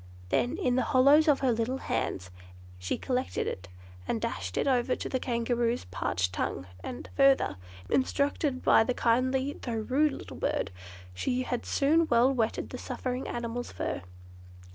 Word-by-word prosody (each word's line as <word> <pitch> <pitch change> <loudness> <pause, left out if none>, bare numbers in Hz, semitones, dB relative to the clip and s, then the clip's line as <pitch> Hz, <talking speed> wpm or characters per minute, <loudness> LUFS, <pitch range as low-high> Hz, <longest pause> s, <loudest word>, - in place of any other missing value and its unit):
Then, 250 - +1
in 255 -10 +1
the - - +3 0.2
hollows 285 +5 +6
of 290 -3 +4
her 260 -2 +3
little 230 +3 -1
hands, 95 - -3 0.5
she 90 - -2
collected 255 0 -1
it, 90 -1 -5 0.4
and 115 - 0
dashed 95 -2 -4
it - - +1
over 255 -1 +2
the 260 - -3
Kangaroo's 235 -1 0
parched 90 0 -1
tongue, 90 - -2 0.2
and, 120 - -6
further 275 - +4 0.3
instructed 280 0 0
by - - +6
the 250 +2 -1
kindly 260 +4 +1
though 240 - -4
rude 265 +7 +1
little - - -9
bird, - - -1 0.4
she 250 - -1
had 245 -1 -3
soon 315 +4 +3
well 240 +3 +4
wetted 230 -4 -1
the - - -6
suffering 255 0 -4
animal's 240 +1 -4
fur. - - -3
250 Hz, 155 wpm, -29 LUFS, 230-270 Hz, 0.5 s, hollows